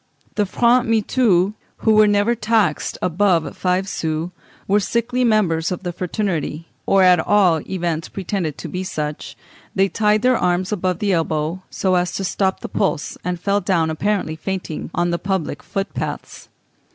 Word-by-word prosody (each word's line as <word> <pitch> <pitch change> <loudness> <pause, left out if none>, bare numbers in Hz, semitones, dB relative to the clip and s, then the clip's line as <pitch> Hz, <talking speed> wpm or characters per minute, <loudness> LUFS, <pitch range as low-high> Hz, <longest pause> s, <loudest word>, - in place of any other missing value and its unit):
The 205 -2 0
francs 235 +4 +3
mitoux, 215 -4 +2 0.3
who 220 - +5
were 215 0 +6
never 205 +3 +3
taxed 215 -7 0
above 180 -1 +1
five 185 +1 0
sous, 160 -1 -2 0.4
were 205 +2 +4
sickly 235 +5 0
members 190 -7 +2
of 180 - -4
the 175 -1 -3
fraternity, 170 -4 -3 0.2
or 195 -1 +5
at 180 -1 +6
all 180 -4 +3
events 170 -4 -2
pretended 185 -5 -3
to - - -6
be 180 +1 -4
such; 150 -5 -5 0.4
they 195 0 +3
tied 210 +1 +2
their 255 0 +4
arms 180 +2 0
above 185 -3 0
the 200 0 0
elbow 160 +1 -1
so 190 -1 0
as 180 0 +1
to 195 - -3
stop 190 0 0
the - - -5
pulse, 195 -7 -1
and 180 0 -2
fell 200 +3 +1
down 165 -5 +1
apparently 185 -1 -1
fainting 180 -1 -4
on 175 0 +1
the 170 - -1
public 190 -4 -2
footpaths. 195 0 -5
185 Hz, 165 wpm, -20 LUFS, 170-205 Hz, 0.4 s, were